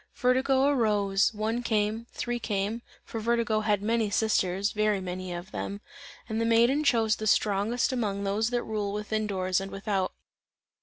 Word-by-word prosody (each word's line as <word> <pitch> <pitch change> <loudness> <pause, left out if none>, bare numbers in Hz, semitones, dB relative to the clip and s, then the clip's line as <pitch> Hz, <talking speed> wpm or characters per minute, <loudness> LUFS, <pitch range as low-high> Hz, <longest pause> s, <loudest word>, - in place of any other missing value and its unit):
Vertigo 260 +1 +2
arose; 210 -8 +2
one 220 +2 -2
came, 220 0 -1
three 240 0 -3
came, 210 +1 -2 0.2
(for 225 - -5
Vertigo 230 -1 +1
had 210 -2 0
many 225 0 +1
sisters, 200 -2 +1
very 215 -1 +1
many 185 0 -5
of 175 +2 -6
them) 200 - -4 0.5
and 220 0 -2
the - - +2
Maiden 235 +6 +3
chose 225 -6 +3
the 215 - -3
strongest 215 +6 +2
among 205 -5 -1
those 205 +3 0
that 245 -1 -1
rule 210 -2 -3
within 215 +1 -2
doors 185 -2 0
and 195 - -5
without. 195 -1 -2
215 Hz, 160 wpm, -28 LUFS, 200-230 Hz, 0.5 s, Maiden